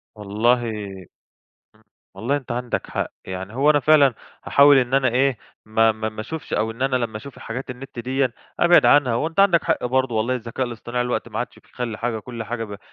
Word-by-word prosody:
والله 115 +4 +1 1.1
إمم، 110 - -26 0.3
والله 135 +6 -1
أنت 135 -4 -5
عندك 120 0 -3
حق، - - -2 0.2
يعني 95 +3 -6
هو 140 +4 +3
أنا 145 -1 +4
فعلًا 145 -3 +5 0.3
هاحاول 140 0 +6
إن 125 0 0
أنا 135 -2 +3
إيه 130 +1 +1 0.3
ما 110 +1 +3
ما 110 0 -3
ما 110 0 -7
أشوفش 160 +7 -7
أو 110 +1 0
إن 115 +3 -6
أنا 135 -1 +2
لمّا 115 -3 -2
أشوف 135 +5 -10
حاجات 125 +3 -6
النت 135 0 -10
ديّة 130 +1 0 0.3
أبعد 175 0 +6
عنها، 145 -5 +5
وأنت 160 +9 0
عندك 190 -4 +4
حق 165 -6 0
برضو 130 -1 0
والله 115 +4 +1
الذكاء 120 +1 -3
الاصطناعي 120 +1 -3
دلوقتي 125 - -2
ما - - -4
عادش - - -5
بيخلّي 115 -3 -6
حاجة، 115 -2 -2
كُلّ 115 +1 -7
حاجة 115 +1 -4
ب 105 -2 -8
125 Hz, 200 wpm, -22 LUFS, 115-135 Hz, 1.1 s, هاحاول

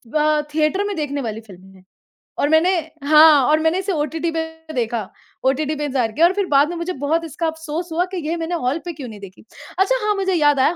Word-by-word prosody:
अ, 305 0 +3
theatre 315 +6 +1
में 405 - -3
देखने 290 -2 -3
वाली 225 -2 -5
फ़िल्म 190 0 -15
है। 185 - -19 0.6
और 285 - +2
मैंने 320 +4 +4 0.3
हाँ, 305 -1 +7
और 310 +1 +4
मैंने 320 +3 +1
इसे 385 0 -2
ओटीटी 320 +2 -2
पे 325 0 -2 0.3
देखा, 235 -2 -1 0.4
ओटीटी 280 +3 +1
पे 295 - -3
इंतज़ार 255 -6 -1
किया 325 +8 +4
और 350 - +2
फिर 400 -1 -1
बाद 285 0 +3
में 350 - -5
मुझे 340 +2 -3
बहुत 315 +4 -1
इसका 325 +1 -4
अफ़सोस 320 +1 -4
हुआ 345 +2 +1
कि - - -4
ये 335 - -1
मैंने 330 +1 -3
हॉल 275 +6 +1
पे 345 - -4
क्यों 280 -5 -8
नहीं 210 -2 -10
देखी। 190 0 -13 0.3
अच्छा 450 +6 +3
हाँ, 420 - +2
मुझे 385 -2 0
याद 290 -4 +3
आया 305 +6 +3
310 Hz, 235 wpm, -20 LUFS, 275-335 Hz, 0.6 s, हाँ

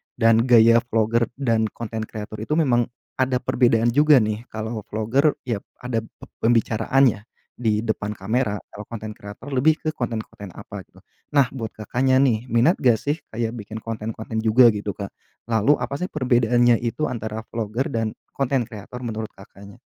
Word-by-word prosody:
dan 115 0 +4
gaya 115 -2 +6
vlogger 115 0 +1
dan 115 -5 +1
konten 110 0 -6
kreator 110 0 -7
itu 130 +8 -2
memang 120 -7 +2 0.3
ada 130 0 +2
perbedaan 120 -2 +3
juga 150 +4 +5
nih. 110 +3 -3
Kalau 110 +1 -5
vlogger, 120 +8 +1
ya 115 -5 -2 0.2
ada 125 -2 -1
p - - -24 0.2
pembicaraannya 115 +1 +2 0.4
di 110 -2 +1
depan 105 -2 -2
kamera. 105 +2 -1 0.2
Kalau 105 - -9
konten 110 -2 -6
kreator 105 +7 -10
lebih 140 +4 +3
ke 155 - 0
konten-konten 110 - -5
apa - - -9
gitu. - - -21 0.3
Nah 135 -3 +4
buat 115 -5 -6
Kakaknya 125 +5 +1
nih, 120 -2 +1
minat 120 +10 +3
nggak 120 -3 +4
sih, 145 +7 -2 0.2
kayak 115 0 -1
bikin 110 +1 -8
konten-konten 110 0 -4
juga 115 +2 +6
gitu 105 -2 -4
Kak? 100 0 -6 0.4
Lalu 115 +6 +4
apa 140 - -3
sih 180 - -2
perbedaannya 120 - +3
itu 120 +6 -3
antara 110 -1 -4
vlogger 115 +3 -2
dan 115 -2 -2 0.2
konten 135 -2 0
kreator 115 +2 -9
menurut 110 -2 -4
Kakaknya? 100 +1 -14
115 Hz, 165 wpm, -23 LUFS, 110-125 Hz, 0.4 s, gaya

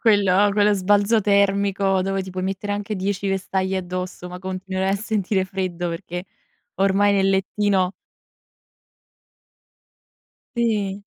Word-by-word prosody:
Quello 205 -2 +4
quello 205 0 +4
sbalzo 205 +3 +3
termico 200 -1 +2
dove 195 +1 -1
ti 190 - -8
puoi 185 0 -4
mettere 195 +2 -3
anche 205 +1 -3
10 195 +1 -2
vestaglie 190 0 -1
addosso, 180 0 -5
ma 180 - -7
continuerai 190 +1 -2
a - - +2
sentire 200 -2 -1
freddo 185 -2 -3
perché 175 +1 -5 0.5
ormai 195 +1 +3
nel 195 -1 +3
lettino 195 -1 +1 2.6
Sì. 205 -4 0
195 Hz, 120 wpm, -22 LUFS, 185-205 Hz, 2.6 s, Quello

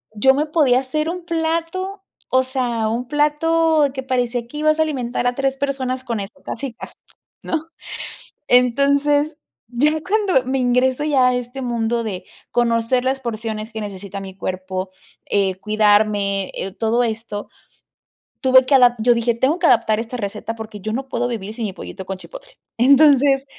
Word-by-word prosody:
yo 265 +6 +5
me 295 +3 0
podía 290 -5 +3
hacer 305 +4 -2
un 350 0 -5
plato, 335 +4 -2 0.3
o 260 - +4
sea, 250 -4 -1
un 235 +3 -2
plato 300 +2 +2
que 265 - -4
parecía 245 -2 -1
que 295 - -9
ibas 310 +1 +2
a - - +5
alimentar 250 -5 -1
a 245 - 0
3 270 0 -1
personas 265 -2 -2
con 235 -4 -3
eso, 200 +2 -6
casi 260 0 -5
casi, - - -10 0.5
¿no? 320 -1 -2 0.8
Entonces, 280 +4 +3 0.4
ya 290 +6 +3
cuando 385 - +2
me 265 +1 -1
ingreso 255 +2 +2
ya 265 -4 +4
a 250 - +1
este 250 +2 -5
mundo 235 -1 -1
de 195 -5 -5 0.3
conocer 240 +1 +1
las 265 +1 0
porciones 220 -2 -4
que 220 - -6
necesita 200 -1 -6
mi 190 -1 -9
cuerpo, 185 0 -4 0.3
eh, 195 -2 +1
cuidarme, 205 -2 +2 0.3
todo 230 +2 +1
esto, 220 -2 -4 0.9
tuve 260 0 +6
que 260 - 0
ada 245 -2 +6
yo 240 +2 +4
dije, 235 0 +1
tengo 270 +9 +1
que 340 - +3
adaptar 220 -4 +3
esta 230 +2 -5
receta 210 +1 -4
porque 220 -2 -8
yo 215 +3 -4
no 270 +2 -4
puedo 245 0 -1
vivir 215 -4 -5
sin 225 0 -4
mi 200 - -4
pollito 190 +1 -8
con 190 0 -5
chipotle. - - -12 0.2
Entonces, 275 +1 +5
250 Hz, 170 wpm, -20 LUFS, 220-280 Hz, 0.9 s, tuve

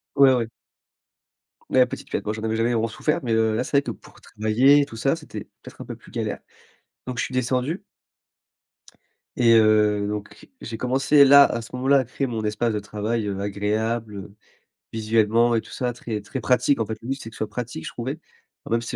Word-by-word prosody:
Ouais 135 -1 +7
ouais. 120 -3 0 1.2
Ouais, 130 -1 +5
petite 125 - -8
pièce, - - -2
moi, 105 - -2
j'en 110 0 -7
avais 110 0 -1
jamais 115 +2 +1
vraiment 115 0 +1
souffert, 150 +7 -1
mais, 120 -2 -1
heu, 110 -1 +2
là 115 - 0
c'est 140 - 0
vrai 140 - +5
que - - -5
pour - - -15
travailler 125 +7 +3
et - - 0
tout 125 -5 -11
ça, 135 +7 +1
c'était 150 -10 -8 0.2
peut-être - - -12
un - - -7
peu - - -7
plus - - -18
galère. - - -3 0.7
Donc 125 -1 -5
je - - +1
suis - - -5
descendu 130 +6 -1 1.5
et 115 -2 +5
heu, 105 -1 +3
donc 105 0 -6
j'ai 115 -1 -6
commencé, 135 +4 +4
là, 140 +1 +9
à 120 - -2
ce 115 - -9
moment-là, 135 +2 +3
à 130 - -1
créer 135 +3 -3
mon 115 -3 -3
espace 110 +2 0
de 105 - -1
travail, 105 +2 -3
heu, 100 -1 -3
agréable, 105 +2 -2
heu, 100 0 -9 0.6
visuellement 115 +1 +2
et 115 - +1
tout - - -15
ça 125 -1 -2
très 115 -3 -5
très 105 +6 -6
pratique. 125 +2 +2
En - - +2
fait, 110 0 -5
le 115 - -10
but 135 - 0
c'est 125 -5 -9
que - - -17
ce - - -12
soit 110 - -2
pratique, 115 -6 -6
je - - -4
trouvais. 130 +6 -4 0.5
Enfin, - - -5
même 115 - +1
s'il 115 - -6
115 Hz, 225 wpm, -23 LUFS, 110-125 Hz, 1.5 s, là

